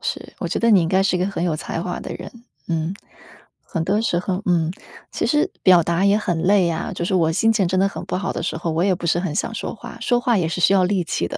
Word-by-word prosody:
是， - - -4
我 - - -3
觉 - - -2
得 230 0 +3
你 195 -4 +6
应 165 - 0
该 190 +2 +3
是 195 -2 +1
一 - - -2
个 180 - 0
很 195 -3 -3
有 165 -3 0
才 165 - -4
华 180 -1 -4
的 - - -6
人， 180 +3 -8 0.4
嗯。 165 +2 -1 0.8
很 165 -3 -1
多 205 +4 +1
时 175 -6 0
候， 185 +1 -2
嗯。 170 -2 +1 0.4
其 - - -1
实 310 +5 +2
表 180 -2 +6
达 170 +4 0
也 200 +1 +4
很 175 -6 -1
累 190 -2 +4
啊， 160 - -3
就 170 - -3
是 190 - -1
我 165 -3 +2
心 225 +6 +3
情 205 -5 +1
真 185 +1 0
的 195 - +3
很 195 - -7
不 185 - -2
好 195 0 -2
的 - - -4
时 - - -2
候， 165 0 -3
我 165 +3 +1
也 190 -2 +3
不 170 - -5
是 170 - +2
很 170 -5 -3
想 - - -1
说 - - -4
话， - - -10
说 245 -1 +1
话 240 -3 +2
也 170 - 0
是 180 - -3
需 195 - +4
要 185 -2 +4
力 190 0 +1
气 85 - -2
的。 - - -5
180 Hz, 315 characters per minute, -21 LUFS, 170-195 Hz, 0.8 s, 你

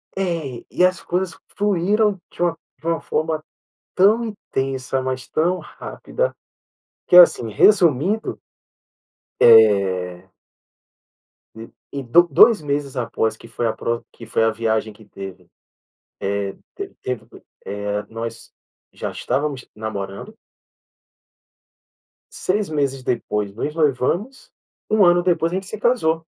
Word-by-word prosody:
É 165 -10 -3
e, 180 - +4
as 185 -1 0
coisas 180 0 -2 0.2
fluíram 205 +1 +1
de - - -10
um 175 - +2 0.3
de 160 - -21
uma 165 -1 0
forma 155 0 -2 0.5
tão 215 +5 +4
intensa, 135 - -3
mas 130 0 -3
tão 175 +3 +1
rápida - - -4 0.8
que, 180 - +6
assim, 145 -10 +7
resumindo, 180 - +3 1.0
eh 95 -5 +4 1.6
Em 140 -1 -5
do 130 +8 +6
2 215 - +6
meses 145 -2 -2
após 110 -2 -1
que - - -14
foi 120 - -2
a 110 - 0
pro 115 0 -3
que 115 - -12
foi 110 0 +1
a 115 - +3
viagem 110 -1 -1
que 110 +1 -18
teve, 95 -3 -10 1.3
eh, 400 -1 -4
te - - -28
teve, 125 -2 -4 0.4
eh, 105 0 -3
nós 115 +1 -7 0.4
já - - -5
estávamos 135 0 -2
namorando. 105 - -6 2.0
6 200 +2 -1
meses 140 -4 -1
depois 105 -5 -2
nos 150 +6 -3
noivamos, 165 - -1 0.4
um 215 -3 +5
ano 175 0 +4
depois 170 -2 +1
a - - -2
gente 190 0 -3
se 215 - -6
casou. 165 -10 +1
140 Hz, 125 wpm, -21 LUFS, 115-185 Hz, 2.0 s, assim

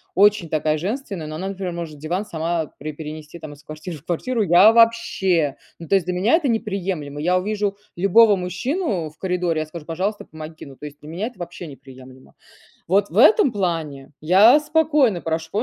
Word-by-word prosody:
очень 205 -1 +4
такая 155 -1 0
женственная, 195 - -4
но 155 - -6
она, 190 +5 -4
например, 190 -2 -5
может 165 -3 -6
диван 175 +7 -3
сама 165 -3 -2
при 155 +1 -6
перенести 155 +1 -9
там 155 -2 -9
из 145 +1 -17
квартиры 155 +2 -8
в 150 - -20
квартиру- 225 +6 -1
я 185 +4 +7
вообще! 190 -10 +2 0.2
Ну, 165 - -10
то - - +4
есть 190 -4 +1
для 180 - -2
меня 200 - +3
это 325 -4 0
неприемлемо. 190 - -3
Я 180 +4 +2
увижу 205 +1 -2 0.2
любого 205 +3 +5
мужчину 185 - -2
в 150 - -24
коридоре, 180 -3 -1
я - - -3
скажу: 160 -1 -9
"Пожалуйста, 190 +6 -3
помоги". 155 0 -10
Ну, 135 -2 -13
то - - -10
есть 145 0 -10
для 150 - -11
меня 180 +7 -3
это 245 - -12
вообще 175 0 -7
неприемлемо. 130 -1 -14 0.5
Вот 200 +3 +2
в 180 - -7
этом 295 - +6
плане 165 -9 -3
я 200 - +6
спокойно 300 - +2
прош 160 0 -3
175 Hz, 190 wpm, -21 LUFS, 155-205 Hz, 0.5 s, я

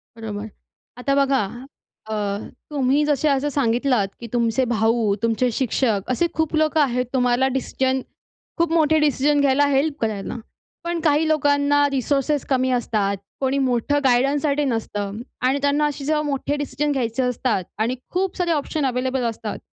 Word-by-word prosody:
बरोबर. 220 -2 -6 0.5
आता 275 +2 0
बघा. 275 -1 +3 0.7
अ, - - -2 0.6
तुम्ही 280 0 +2
जसे 295 0 +1
असं 280 +1 +1
सांगितलात 245 -5 +1
की 235 - -7
तुमचे 235 +1 +1
भाऊ, 225 -2 +1
तुमचे 230 +2 +2
शिक्षक 230 -4 0
असे 340 +7 +2
खूप 320 0 -1
लोकं 310 0 +2
आहेत 250 -3 +1
तुम्हाला 250 0 +2
डिसिजन, 265 0 0 0.6
खूप 335 -1 +1
मोठे 315 -1 +3
डिसिजन 290 0 +2
घ्यायला, 280 +1 +3
हेल्प 285 +1 +1
करायला. 215 -2 -2 0.5
पण 340 0 -2
काही 310 0 +2
लोकांना 290 -1 +3
रिसोर्सेस 275 +2 0
कमी 260 -1 +2
असतात. 210 -5 0 0.2
कोणी 270 0 +1
मोठं 260 +2 +1
गाईडन्ससाठी 280 +3 +2
नसतं 210 -5 -3 0.3
आणि 265 +2 +2
त्यांना 285 +1 +2
असे 290 -1 -4
जेव्हा 300 +1 +1
मोठे 290 0 -2
डिसिजन 290 0 -2
घ्यायचे 250 -2 -1
असतात 250 -5 0
आणि 225 +3 0 0.2
खूप 375 +1 -1
सारे 355 -1 0
ऑप्शन 300 -1 -1
अवेलेबल 255 +1 -1
असतात. 225 -2 -3
270 Hz, 150 wpm, -22 LUFS, 240-290 Hz, 0.7 s, बघा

